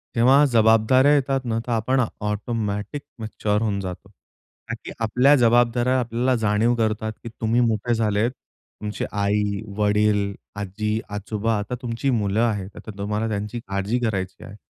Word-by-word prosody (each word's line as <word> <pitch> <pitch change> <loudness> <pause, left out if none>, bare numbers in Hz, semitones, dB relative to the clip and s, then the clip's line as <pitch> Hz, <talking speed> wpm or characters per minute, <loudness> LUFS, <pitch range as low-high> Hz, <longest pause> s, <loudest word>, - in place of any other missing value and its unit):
तेव्हा 130 +5 +6
जबाबदाऱ्या 115 +2 +4
येतात 135 -2 +1
ना 115 -2 -1
तर - - -2
आपण 120 +4 +1
आ 125 - +3 0.2
ऑटोमॅटिक 105 +3 -3 0.2
मॅच्युअर 105 -1 -1
होऊन 105 -3 0
जातो. 95 0 -7
का 115 +3 -14
की - - -7
आपल्या 125 +6 +4
जबाबदाऱ्या 120 +1 +3
आपल्याला 120 +2 0
जाणीव 110 +3 +2
करतात, 110 -1 -1
की 115 - -6
तुम्ही 115 +2 +2
मोठे 115 0 +1
झालेत 110 +1 +1
तुमची 105 -4 -8
आई, 100 0 0 0.2
वडील, 105 -1 +2 0.2
आजी, 105 +2 -2
आजोबा 105 +2 -2
आता 105 +4 -4
तुमची 120 +2 -2
मुलं 105 -4 +1
आहेत. 105 -5 0
अता 110 - -9
तुम्हाला 105 +2 -2
त्यांची 105 +2 -3
काळजी 100 +5 -1
करायची 95 -6 -3
आहे. 105 - -10
110 Hz, 150 wpm, -23 LUFS, 105-120 Hz, 0.2 s, तेव्हा